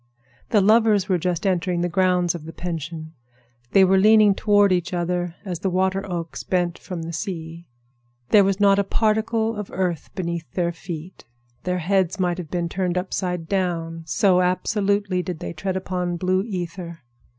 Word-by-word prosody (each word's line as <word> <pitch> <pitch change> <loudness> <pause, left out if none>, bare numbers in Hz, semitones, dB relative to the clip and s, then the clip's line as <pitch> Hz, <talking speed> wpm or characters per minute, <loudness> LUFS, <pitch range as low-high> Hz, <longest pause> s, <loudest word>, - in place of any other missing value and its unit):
The 210 - +4
lovers 215 -2 +4
were 185 -2 +1
just 180 +2 -2
entering 180 -2 0
the 175 - +1
grounds 180 -1 +2
of 165 -3 -8
the 165 - -8
pension. 160 -2 -5 0.6
They 195 -1 +6
were 190 +1 +4
leaning 215 0 +6
toward 205 -1 +3
each 180 0 0
other 175 0 -2
as 180 -4 -4
the 190 - -1
water 190 +1 0
oaks 170 -2 -4
bent 175 -2 -1
from 175 -3 -6
the 165 +1 -6
sea. 165 -2 -6 0.6
There 205 -2 +6
was 195 0 0
not 200 -1 +5
a - - +3
particle 220 +2 0
of 210 -2 -5
earth 180 -4 -2
beneath 170 -2 -4
their 175 -2 0
feet. 170 +1 -8 0.4
Their 180 0 0
heads 190 +2 0
might 180 -1 0
have 165 -4 -7
been 175 0 -1
turned 180 0 -1
upside 180 -2 -2
down, 165 -4 -2
so 185 +5 +3
absolutely 195 +1 0
did 180 -2 -5
they - - -6
tread 185 +3 -3
upon 180 -2 -2
blue 185 +1 +1
ether. 175 -4 -6
180 Hz, 175 wpm, -23 LUFS, 170-195 Hz, 0.6 s, They